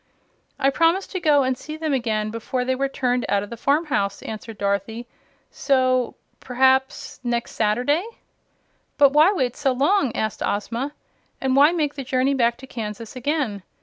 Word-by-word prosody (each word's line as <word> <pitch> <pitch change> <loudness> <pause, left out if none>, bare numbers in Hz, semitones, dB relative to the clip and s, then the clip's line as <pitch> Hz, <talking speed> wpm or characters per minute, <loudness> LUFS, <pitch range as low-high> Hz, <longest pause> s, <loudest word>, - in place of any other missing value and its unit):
"I 275 - +2
promised 335 +6 +1
to 375 - -3
go 295 -4 +4
and 260 0 0
see 305 +5 -8
them 315 -2 -2
again 215 -4 -1
before 250 +3 -3
they 260 - +1
were 275 +1 -1
turned 250 -2 0
out 200 0 +1
of 205 - -10
the - - -4
farmhouse," 275 -6 0
answered 220 0 -7
Dorothy; 200 +4 -2 0.5
"so 255 -2 +1 0.2
perhaps 265 +1 +1
next 240 -1 -2
Saturday 245 - +1 0.5
" - - -44
"But 285 -1 +5
why 310 +6 +6
wait 255 - -1
so 280 -3 +1
long?" 280 - +2
asked 215 -2 -2
Ozma. 235 +7 -2 0.5
"And 265 -1 0
why 290 +3 +6
make 305 -4 -1
the 275 - -6
journey 260 +2 +1
back 235 -3 +1
to 265 - -11
Kansas 225 -3 -7
again? 255 -6 -2
260 Hz, 170 wpm, -23 LUFS, 230-285 Hz, 0.5 s, why